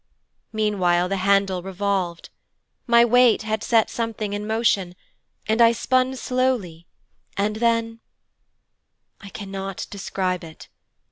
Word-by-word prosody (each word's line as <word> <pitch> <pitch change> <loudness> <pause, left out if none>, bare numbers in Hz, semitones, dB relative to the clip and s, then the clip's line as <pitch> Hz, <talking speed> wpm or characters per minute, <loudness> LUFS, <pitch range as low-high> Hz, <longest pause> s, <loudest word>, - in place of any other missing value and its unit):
Meanwhile 185 -5 +1
the 195 - -1
handle 195 -1 +2
revolved. 190 -2 -3 0.6
My 235 0 +6
weight 245 -1 +4
had 220 0 -2
set 225 -2 +3
something 225 -3 -4
in 205 +1 -4
motion 215 -5 0 0.5
and 220 +2 +2
I 230 0 +6
span 255 +2 +1
slowly, 250 -11 -2 0.5
and 210 +2 0
then 230 0 0 1.2
'I 200 - -10
cannot 195 -1 -6
describe 185 -2 -3
it. 160 -1 -12
205 Hz, 115 wpm, -23 LUFS, 190-230 Hz, 1.2 s, My